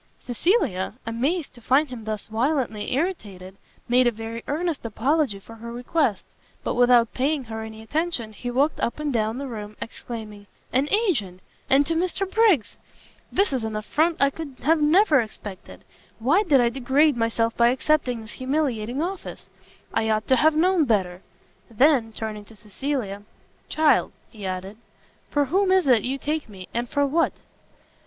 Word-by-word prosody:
Cecilia, 245 Hz, -, 0 dB
amazed 275 Hz, +9 st, -1 dB
to 240 Hz, -, -12 dB
find 270 Hz, +5 st, +3 dB
him 235 Hz, -4 st, -8 dB
thus 215 Hz, -2 st, -3 dB
violently 235 Hz, -1 st, -1 dB
irritated, 205 Hz, -, -3 dB, 0.3 s
made 250 Hz, +1 st, +4 dB
a -, -, +3 dB
very 225 Hz, +1 st, -7 dB
earnest 320 Hz, +1 st, -2 dB
apology 245 Hz, +1 st, 0 dB
for 225 Hz, +3 st, -13 dB
her 235 Hz, +1 st, -8 dB
request; 245 Hz, -, 0 dB, 0.4 s
but -, -, -1 dB
without 245 Hz, -2 st, +4 dB
paying 280 Hz, +2 st, 0 dB
her 220 Hz, -2 st, -6 dB
any 220 Hz, 0 st, -8 dB
attention, 290 Hz, -4 st, -2 dB
he 245 Hz, +4 st, -6 dB
walked 275 Hz, +5 st, +1 dB
up 235 Hz, -, -2 dB
and 300 Hz, -2 st, -2 dB
down 220 Hz, 0 st, 0 dB
the 280 Hz, -, -4 dB
room, 210 Hz, -3 st, -7 dB
exclaiming, 215 Hz, -3 st, -8 dB, 0.3 s
"an 270 Hz, +4 st, +2 dB
agent! 280 Hz, -, 0 dB, 0.3 s
and 275 Hz, +2 st, +5 dB
to 330 Hz, -, 0 dB
Mr 365 Hz, +3 st, -1 dB
Briggs! 385 Hz, -, +2 dB, 0.5 s
This 395 Hz, -6 st, +2 dB
is 255 Hz, -4 st, -1 dB
an 220 Hz, -1 st, -3 dB
affront 310 Hz, +10 st, +1 dB
I 280 Hz, 0 st, +4 dB
could 285 Hz, -4 st, -8 dB, 0.2 s
never 305 Hz, -, +5 dB
have 225 Hz, -, -4 dB
expected! 200 Hz, -3 st, -10 dB, 0.3 s
why 280 Hz, -, +3 dB
did 305 Hz, -10 st, +4 dB
I 240 Hz, -1 st, +4 dB
degrade 270 Hz, +4 st, +2 dB
myself 230 Hz, 0 st, 0 dB
by 235 Hz, -, +4 dB
accepting 255 Hz, -1 st, +1 dB
this 220 Hz, -, -9 dB
humiliating 260 Hz, -2 st, -1 dB
office? 375 Hz, +2 st, -6 dB, 0.4 s
I 220 Hz, -, +1 dB
ought 215 Hz, 0 st, 0 dB
to 260 Hz, -, +6 dB
have 310 Hz, +5 st, +4 dB
known 350 Hz, 0 st, +3 dB
better!" 190 Hz, -6 st, 0 dB, 0.5 s
Then, 245 Hz, 0 st, +3 dB
turning 215 Hz, -1 st, -5 dB
to 225 Hz, -, -14 dB
Cecilia, 210 Hz, 0 st, -4 dB, 0.5 s
"Child," 310 Hz, -1 st, +3 dB, 0.2 s
he 210 Hz, -4 st, -7 dB
added, 190 Hz, +2 st, -5 dB, 0.5 s
"for 290 Hz, -1 st, +2 dB
whom 375 Hz, +7 st, +2 dB
is 375 Hz, -1 st, +4 dB
it 245 Hz, -5 st, +5 dB
you 260 Hz, +4 st, -2 dB
take 300 Hz, -1 st, -3 dB
me, 190 Hz, -3 st, -10 dB
and 240 Hz, +1 st, -2 dB
for 285 Hz, -1 st, +1 dB
what?" 320 Hz, +4 st, +1 dB
250 Hz, 165 wpm, -24 LUFS, 220-300 Hz, 0.5 s, to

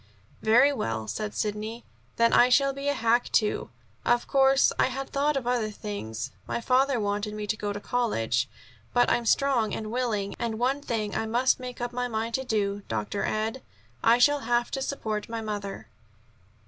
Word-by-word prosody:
"Very 245 Hz, +6 st, +5 dB
well," 110 Hz, -, -3 dB
said 210 Hz, -, -4 dB
Sidney. 215 Hz, +2 st, -3 dB, 0.3 s
"Then 230 Hz, 0 st, +3 dB
I 245 Hz, -, +6 dB
shall 275 Hz, +2 st, +4 dB
be 275 Hz, +1 st, -5 dB
a 285 Hz, -, +3 dB
hack, 235 Hz, 0 st, +2 dB
too. 210 Hz, -2 st, +1 dB, 0.3 s
Of 240 Hz, 0 st, +2 dB
course, 270 Hz, 0 st, +4 dB
I -, -, +5 dB
had 265 Hz, +1 st, -5 dB
thought 285 Hz, +1 st, +1 dB
of 260 Hz, -, -3 dB
other 240 Hz, -3 st, 0 dB
things, 160 Hz, -, -5 dB, 0.2 s
my -, -, -2 dB
father 255 Hz, +2 st, +2 dB
wanted 205 Hz, 0 st, -2 dB
me 210 Hz, 0 st, -4 dB
to 210 Hz, -, -1 dB
go 205 Hz, -1 st, -3 dB
to 205 Hz, -, -4 dB
college, 130 Hz, -, 0 dB, 0.5 s
but 245 Hz, -, +4 dB
I'm 235 Hz, -1 st, +1 dB
strong 265 Hz, -6 st, +2 dB
and 215 Hz, -1 st, -5 dB
willing. 225 Hz, -5 st, -1 dB
And 230 Hz, -2 st, -2 dB
one 260 Hz, +4 st, 0 dB
thing 220 Hz, -6 st, -2 dB
I 220 Hz, -, -1 dB
must 245 Hz, +4 st, +2 dB
make 250 Hz, -1 st, -7 dB
up 240 Hz, 0 st, -3 dB
my 245 Hz, 0 st, -1 dB
mind 225 Hz, 0 st, -3 dB, 0.2 s
to, 205 Hz, -2 st, 0 dB
Dr. 110 Hz, -, -2 dB
Ed; 220 Hz, +4 st, -2 dB, 0.4 s
I 230 Hz, +1 st, +6 dB
shall 290 Hz, +4 st, +4 dB
have 240 Hz, -1 st, 0 dB
to 270 Hz, -, -2 dB
support 220 Hz, -7 st, -3 dB
my 230 Hz, 0 st, -3 dB
mother." 200 Hz, -, -5 dB
230 Hz, 185 wpm, -27 LUFS, 210-250 Hz, 0.5 s, I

